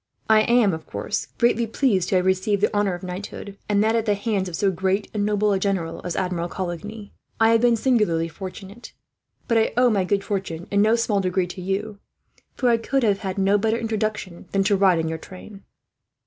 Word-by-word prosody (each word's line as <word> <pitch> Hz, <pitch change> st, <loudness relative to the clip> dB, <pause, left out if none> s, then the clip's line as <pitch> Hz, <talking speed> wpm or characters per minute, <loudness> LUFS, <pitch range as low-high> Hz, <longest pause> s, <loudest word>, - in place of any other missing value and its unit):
I 220 Hz, 0 st, +6 dB
am, 235 Hz, -4 st, +3 dB
of 160 Hz, -, -7 dB
course, -, -, -3 dB
greatly 235 Hz, -1 st, +2 dB
pleased 220 Hz, -6 st, +1 dB
to 190 Hz, -, +3 dB
receive 190 Hz, +2 st, +1 dB
the 205 Hz, -, +1 dB
honour 205 Hz, -3 st, +1 dB
of 175 Hz, -, -11 dB
knighthood, 195 Hz, +2 st, -7 dB
and 205 Hz, 0 st, +3 dB
that 220 Hz, +1 st, +2 dB
at 225 Hz, -1 st, 0 dB
the 205 Hz, -, +3 dB
hands 200 Hz, -2 st, -1 dB
of 170 Hz, -, -5 dB
so 195 Hz, +2 st, +1 dB
great 190 Hz, +3 st, -1 dB
and 210 Hz, -1 st, -1 dB
noble 210 Hz, 0 st, +1 dB
a 195 Hz, -, +1 dB
general 185 Hz, -4 st, -2 dB
as 175 Hz, -, -4 dB
Admiral 175 Hz, -2 st, -2 dB
Coligny. 200 Hz, +4 st, -6 dB, 0.3 s
I 225 Hz, 0 st, +5 dB
have 230 Hz, 0 st, +4 dB
been 240 Hz, -1 st, +4 dB
singularly 210 Hz, -10 st, +1 dB
fortunate, 190 Hz, +6 st, -9 dB, 0.5 s
but 230 Hz, -2 st, +3 dB
I 220 Hz, -, +1 dB
owe 250 Hz, -1 st, +5 dB
my 200 Hz, -3 st, +2 dB
good 195 Hz, +2 st, 0 dB
fortune 185 Hz, -5 st, -4 dB
in 200 Hz, 0 st, +3 dB
no 220 Hz, +2 st, +4 dB
small 230 Hz, -3 st, +1 dB
degree 185 Hz, 0 st, 0 dB
to 180 Hz, +1 st, -8 dB
you; 200 Hz, +3 st, -3 dB, 0.6 s
for 250 Hz, -, +1 dB
I 235 Hz, -, +4 dB
could 265 Hz, +3 st, -1 dB
have 205 Hz, -3 st, +2 dB
had 190 Hz, -3 st, -4 dB
no 195 Hz, +1 st, +3 dB
better 220 Hz, +2 st, +1 dB
introduction 215 Hz, -5 st, -3 dB
than 195 Hz, 0 st, +2 dB
to 205 Hz, +1 st, +2 dB
ride 190 Hz, -3 st, +4 dB
in 160 Hz, 0 st, -1 dB
your 160 Hz, 0 st, -3 dB
train." 195 Hz, +3 st, -12 dB
200 Hz, 215 wpm, -23 LUFS, 185-220 Hz, 0.6 s, I